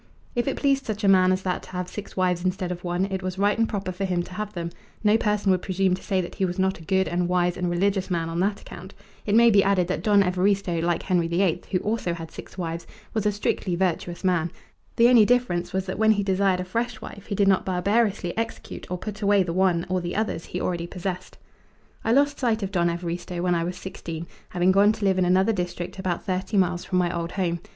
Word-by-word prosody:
If 240 +2 -1
it 275 - -1
pleased 275 -1 +1
such 215 -1 -3
a - - +3
man 185 -1 +5
as 185 0 0
that 180 -1 -1
to - - -14
have 180 0 -3
six 205 +2 -8
wives 180 -2 +1
instead 185 -1 -1
of 175 0 -6
one 175 +1 0
it 190 0 -2
was 185 0 -4
right 205 +1 +2
and 225 0 +1
proper 195 -3 -3
for 185 +2 -5
him 180 -2 0
to 180 - -11
have 210 +2 -4
them; 170 -1 -4 0.3
no 210 0 +5
person 210 -3 +1
would 185 -1 +2
presume 190 0 +1
to 185 - -3
say 190 -2 0
that 175 - -7
he 195 - -2
was 180 -1 -1
not 190 -1 0
a - - -12
good 190 +2 +1
and 175 +2 0
wise 180 -1 +2
and 180 -1 -1
religious 190 +2 0
man 170 -2 -1
on 165 +1 -3
that 200 +2 0
account. 185 +3 -11 0.3
It 205 - +2
may 235 0 +7
be 200 -2 +5
added 195 -2 +2
that 185 - -1
Don 205 -2 +4
Evaristo, 185 -1 +1
like 170 0 0
Henry 175 -3 +1
VIII, 170 0 +1
who 190 - +1
also 210 -5 -1
had 165 -1 -8
six - - -11
wives, 170 -2 -4 0.3
was 215 -2 0
a - - +3
strictly 195 -3 -1
virtuous 175 -1 -1
man. 175 -3 +1 0.4
The 235 - +6
only 240 -3 +7
difference 225 -7 +1
was 190 0 -1
that 190 +1 -5
when 220 0 +5
he 205 -1 -1
desired 190 -1 +2
a - - -5
fresh 230 +4 -2
wife 200 -1 -10
he 205 - -2
did 200 0 +3
not 190 -1 +4
barbarously 195 0 0
execute 225 0 -5
or 180 - -2
put 210 +3 -7
away 200 -1 +4
the 170 -2 -3
one, 180 -2 +2
or 185 0 0
the 175 0 -4
others, 215 -5 -2
he 180 - -5
already 170 -2 -2
possessed. 180 0 -5 0.7
I 225 - +1
lost 285 +3 +3
sight 225 -4 +1
of 195 - -3
Don 175 -2 +2
Evaristo 175 +1 -4
when 180 -1 +2
I 170 -1 +1
was 180 +1 -4
sixteen, 170 -3 -6 0.2
having 180 +1 +2
gone 200 +3 +5
to 215 -2 -4
live 190 -1 +3
in 185 - +3
another 190 +5 +3
district 180 -1 -4
about 185 -2 -2
thirty 190 +2 -1
miles 180 -2 +1
from 185 - -1
my 175 -1 +1
old 170 0 -3
home. 175 -3 -1
185 Hz, 250 wpm, -25 LUFS, 175-200 Hz, 0.7 s, may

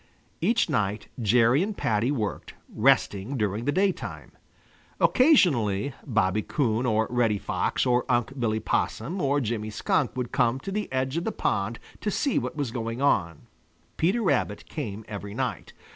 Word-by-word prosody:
Each 225 +7 +2
night 105 - -1
Jerry 115 - +4
and 205 +2 -2
Paddy 110 +2 +1
worked, 115 -8 -3 0.2
resting 120 -1 +2
during 105 +1 -1
the 145 - +2
daytime. 190 +3 -1 0.7
Occasionally 140 - +3
Bobby 110 -5 +1
Coon 120 -1 0
or 110 -1 +2
Reddy 115 -4 +2
Fox - - -1
or 125 -1 +3
Unc' 120 +3 0
Billy 110 -2 0
Possum 135 - -1
or 140 +1 +2
Jimmy 110 -4 -2
Skunk 145 - 0
would 125 -2 -3
come 125 0 +2
to 195 - -5
the 210 -4 -3
edge 130 +3 -1
of 170 - -1
the 225 - -1
pond 110 - -1 0.2
to 210 - -2
see 275 +7 +1
what - - -5
was 140 -6 -2
going 115 0 -4
on. 85 - +1 0.5
Peter 195 +8 +1
Rabbit 125 - 0
came 110 -8 -5
every 100 -1 -7
night. 120 - -3
120 Hz, 160 wpm, -26 LUFS, 110-145 Hz, 0.7 s, Jerry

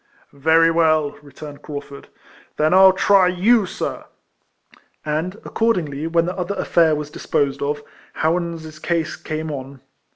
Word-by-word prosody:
" - - -33
Very 160 +4 +3
well," 155 -3 +2
returned 145 0 -11
Craufurd, 145 -2 -8 0.3
" - - -27
then 155 +3 +2
I - - +6
'11 190 0 +7
try 195 -2 +5
you, 195 +4 +3
sir." - - -5 1.0
And, 155 +5 -2
accordingly, 165 -10 -1
when 165 0 +1
the 180 +1 -3
other 185 +2 -3
affair 165 -4 +2
was 150 0 -5
disposed 140 -2 -1
of, 145 +1 -2 0.3
Howans' 160 -1 -2
case 170 -2 -1
came 155 0 -5
on. 135 -1 -8
160 Hz, 150 wpm, -20 LUFS, 145-175 Hz, 1.0 s, 11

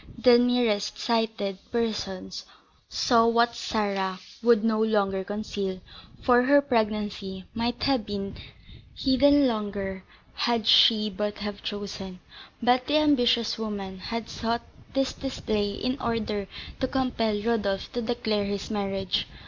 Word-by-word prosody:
The 245 -1 +6
nearest 235 -4 +1
sighted 220 -4 -1
persons 210 -5 -3 0.4
saw 230 -2 +3
what 235 0 +3
Sarah 195 -3 -1 0.2
would 230 -2 +4
no 220 -1 +2
longer 200 -3 +1
conceal, 200 -2 -4 0.4
for 245 -1 +5
her 285 +3 +5
pregnancy 210 -7 -2
might 235 +1 -2
have 270 -5 +2
been 200 -1 -4 0.6
hidden 285 +2 +4
longer 200 -4 -3 0.3
had 235 -2 0
she 215 -1 +6
but 205 +2 -3
have 205 -1 -5
chosen; 200 -3 -6 0.4
but 250 +1 +3
the 295 - +3
ambitious 245 -7 +3
woman 200 -4 -5
had 230 +3 -4
sought 230 +1 -2 0.3
this 270 -1 +1
display 215 -6 -2
in 255 +6 -3
order 215 -4 -2 0.3
to 260 - 0
compel 240 -5 0
Rodolph 205 -3 -1
to 240 - -2
declare 220 -3 -1
his 200 +2 -4
marriage. 195 -2 -1
220 Hz, 125 wpm, -26 LUFS, 200-240 Hz, 0.6 s, The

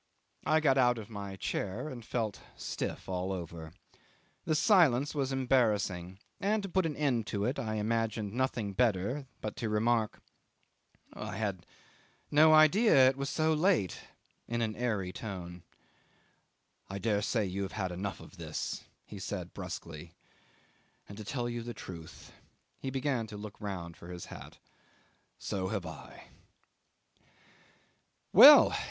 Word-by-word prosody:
I 155 0 +4
got 135 -3 +4
out 125 -1 +4
of 110 0 -8
my 100 -2 -6
chair 100 +6 -3
and 125 -5 -7
felt 110 -3 -2 0.2
stiff - - -5
all 95 0 -2
over. 85 -3 -6 0.7
The 155 - +1
silence 150 - +4
was 140 -3 -1
embarrassing, 105 -9 +1 0.2
and 205 +1 +1
to 195 - -4
put 185 -1 +1
an 150 - -4
end 130 -7 0
to 100 -1 -1
it 125 - -1
I 110 -1 -2
imagined 110 -1 -1
nothing 120 -5 -1
better 120 +5 0
but 110 - -4
to 115 - -2
remark, 110 +1 +1 0.9
"I - - -6
had 100 -5 -3 0.6
no 155 +2 +7
idea 155 - +6
it 130 - -2
was 140 +1 -3
so 160 0 +2
late," 155 - +1 0.5
in 115 0 -1
an 110 -1 -2
airy 105 -7 -2
tone.... 90 -5 -7 1.3
"I 100 - -4
dare 100 +1 0
say 110 0 0
you 95 +1 -3
have 95 - -4
had 95 -1 -2
enough 95 +2 -4
of - - -14
this," - - -4 0.2
he - - -9
said - - -5
brusquely: 85 +1 -7 0.9
"and 100 - -10
to 110 - -8
tell 120 +3 -3
you 120 0 -3
the 120 +1 -7
truth" 85 -3 -10 0.5
he 135 - -4
began 130 -3 -1
to 105 -1 -8
look 105 +1 -9
round 90 -5 -5
for 85 - -12
his 90 -1 -7
hat - - -11 0.8
"so 95 -2 -3
have 100 -2 -3
I." 80 -2 -10 2.0
'Well! - - +10
110 Hz, 145 wpm, -31 LUFS, 95-135 Hz, 2.0 s, Well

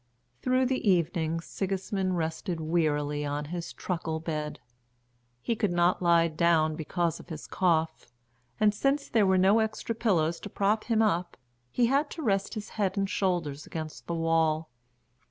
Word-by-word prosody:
Through 255 +1 +2
the 255 -4 0
evening 165 -2 +1
Sigismund 190 0 -2
rested 165 +2 -2
wearily 150 -3 0
on 145 +1 -2
his 170 -1 -4
truckle 165 -3 -3
bed. 155 -2 -4 0.8
He 235 - 0
could 210 -4 0
not 175 +1 +2
lie 170 -1 +4
down 160 -1 +2
because 165 +1 -1
of - - -14
his 155 -3 -7
cough, 160 -6 0 0.5
and, 210 -1 +4
since 275 +6 0
there 215 -4 +3
were 190 0 +4
no 195 +4 +5
extra 220 +1 -1
pillows 175 -8 +1
to 205 - -8
prop 205 +2 +1
him 225 -2 +2
up, 175 -4 0 0.3
he 240 - +2
had 280 +5 +2
to 320 - -4
rest 200 -2 0
his 215 -1 -6
head 200 -2 -1
and 195 0 +1
shoulders 175 -8 -1
against 155 -1 -7
the 170 - -2
wall. 165 -1 +1
175 Hz, 160 wpm, -28 LUFS, 160-205 Hz, 0.8 s, no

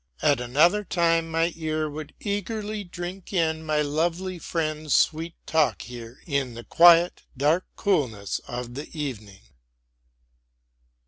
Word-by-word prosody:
At 140 -4 +3
another 155 +12 +3
time 165 -3 +1
my 165 +1 +1
ear 155 -1 -2
would 150 0 -8
eagerly 210 +1 -3
drink 175 +1 -7
in 160 -3 +1
my 155 -1 +1
lovely 170 +5 -1
friend's 155 -3 -1
sweet 165 +2 +1
talk 150 -10 +1
here 120 +2 -10
in 140 -6 -1
the 120 - -8
quiet, 170 +3 +6 0.2
dark 155 +7 +2
coolness 120 - 0
of 120 0 -5
the 145 +4 -7
evening. 105 -9 -5
160 Hz, 125 wpm, -25 LUFS, 140-175 Hz, 0.2 s, quiet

